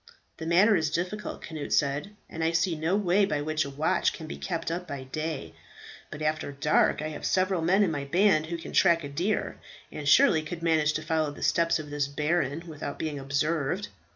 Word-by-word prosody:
"The 160 - -6
matter 190 +6 +5
is 160 -4 +1
difficult," 180 +6 -4
Cnut 155 -3 -6
said, 145 +8 0
"and 160 - -5
I 165 +1 +1
see 170 +1 +2
no 160 +4 0
way 200 0 +3
by 150 -7 0
which 155 +1 0
a - - -5
watch 145 +3 +1
can - - -8
be 70 - -6
kept 70 - -3
up 180 +2 -4
by 140 -3 -5
day; 150 - -4 0.6
but 150 - -7
after 155 -1 -1
dark 150 +1 +2
I 155 - -2
have 155 - -8
several 185 -2 +1
men 190 +5 +3
in 185 - +1
my 145 -2 -3
band 170 0 +3
who 170 +1 -3
can 165 - -9
track 170 -3 +4
a 145 - -5
deer, 180 +9 -2 0.3
and 145 -2 -3
surely 185 - +6
could 165 +2 -7
manage 155 -2 +2
to 155 - -3
follow 160 -1 0
the 145 - -8
steps 170 0 +2
of 150 -2 -8
this 145 -1 0
baron 150 +1 -1
without 150 -3 -6
being 150 -3 -3
observed. 145 +6 -1
160 Hz, 210 wpm, -27 LUFS, 145-175 Hz, 0.6 s, surely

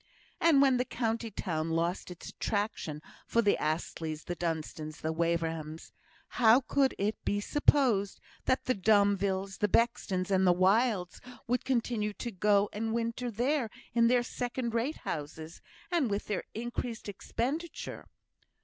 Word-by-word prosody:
And 305 -5 +5
when 265 -2 +4
the 250 - +2
county 230 -2 -2
town 165 -6 -3
lost 170 +3 -1
its 180 - -9
attraction 200 -8 -3 0.2
for 235 - +2
the 205 - +4
Astleys, 155 0 -2
the 175 - -4
Dunstans, 155 -2 -4
the 160 +1 -1
Waverhams, 165 -1 -2 0.4
how 240 +2 +5
could 270 +1 +1
it 210 +2 -2
be 205 - 0
supposed 235 -5 +2 0.3
that 260 - +1
the 255 - +2
Domvilles, 200 -2 +2
the 210 - +3
Bextons, 200 -4 +1
and 190 -1 +4
the 175 - +5
Wildes 195 0 +2 0.3
would 250 +1 0
continue 230 -4 0
to 235 +3 -5
go 205 +1 +3
and 225 +2 -2
winter 235 +1 -2
there 245 +2 0 0.2
in 230 0 +4
their 245 0 +3
second 245 -1 -3
rate 235 +7 0
houses, 155 +2 -6 0.3
and 325 -9 +2
with 200 0 -2
their 205 -3 -3
increased 240 0 -4
expenditure? 270 - -4
210 Hz, 145 wpm, -31 LUFS, 180-240 Hz, 0.4 s, And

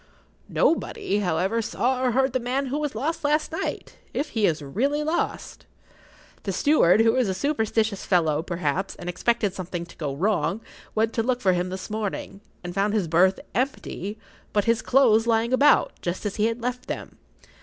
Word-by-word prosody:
Nobody, 210 -9 +1
however, 190 +4 0
saw 250 +3 0
or 250 -2 +2
heard 265 0 +2
the 255 - +1
man 255 +3 -1
who 295 - 0
was 295 -5 -3
lost 315 +8 -2
last 300 +1 +1
night—if 310 -2 -4
he 220 -3 +2
is 155 -3 -1
really 275 - 0
lost. 315 +3 -3 0.7
The 195 - -3
steward, 215 - +4
who 225 +1 +4
is 250 -6 +2
a 190 - -1
superstitious 220 -4 0
fellow, 160 -5 +2
perhaps, 175 +2 -2
and - - -9
expected 205 +2 0
something 180 -2 -5
to 170 - -15
go 145 -4 -3
wrong, 200 +5 0 0.3
went 225 +1 +1
to 230 - +1
look 245 +2 0
for 190 -5 +3
him 180 +1 -1
this 185 +2 -6
morning, 205 -2 -4 0.2
and 175 0 -5
found 200 +3 +1
his 200 -6 +1
berth 180 +4 +3
empty, 225 -5 -3 0.4
but 205 -1 +2
his 230 -1 +2
clothes 235 -4 +4
lying 230 +1 +2
about, 280 +3 +4
just 175 +4 -3
as 205 - -3
he 215 +1 +3
had 230 +1 -2
left 250 +1 -4
them. - - -6
220 Hz, 180 wpm, -25 LUFS, 185-255 Hz, 0.7 s, steward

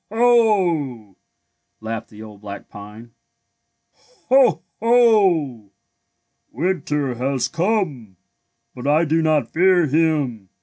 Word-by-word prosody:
Ho! 185 - +1 0.3
'' - - -53
laughed 110 0 -6
the 110 0 -12
old 105 -2 -13
black 100 -1 -10
pine. 105 +3 -12 0.6
'' - - -53 0.4
Ho! 250 - +3 0.2
Ho! 195 - +2 0.8
winter 150 -3 -2
has 130 +1 -2
come, 165 - -2 0.6
but 125 +2 -7
I 155 +3 +3
do 160 +1 0
not 155 -6 0
fear 180 0 +3
him. 145 - -1
150 Hz, 105 wpm, -20 LUFS, 115-185 Hz, 0.8 s, Ho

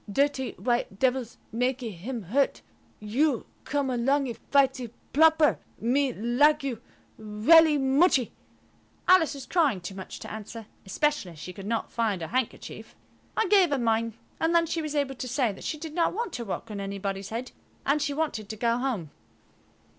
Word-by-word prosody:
Dirty 275 +2 +1
white 240 -5 -1
devils 255 -1 0
makee 250 0 -1
him 215 +6 -6
hurt. 265 +10 0 0.4
You 245 +5 0 0.2
come 285 -2 -1
alongee 255 +1 +1 0.2
fightee 270 -3 +3 0.2
ploper. 315 0 +5 0.2
Me 260 +3 +1
likee 275 +6 +2
you 235 -3 -6 0.4
welly 295 +10 +5
muchee." 270 -1 +3 0.8
Alice 345 -5 +5
was 275 - -8
crying 300 - +2
too 175 +2 -7
much 190 -1 -8
to - - -7
answer, 220 +1 -7 0.2
especially 290 - 0
as - - -16
she 180 - -7
could 195 +2 -8
not 230 0 -2
find 215 -7 -1
her 160 - -5
handkerchief. 255 -1 -4 0.4
I 445 - +3
gave 385 -3 +5
her 285 - +1
mine, 230 -2 0 0.2
and 330 +1 +1
then 335 0 +5
she 330 0 -2
was 305 -1 -4
able 280 -2 0
to 255 0 -6
say 250 -2 +1
that 195 - -11
she 310 - -3
did 310 0 -7
not 340 +1 +1
want 460 -4 -3
to 235 - -4
walk 215 +2 -5
on 205 - -5
anybody's 195 0 -4
head, 240 +3 -5 0.3
and 290 +2 +2
she 290 - 0
wanted 290 -10 -2
to 220 - -4
go 235 +2 +1
home. 225 - -2
255 Hz, 175 wpm, -27 LUFS, 220-290 Hz, 0.8 s, ploper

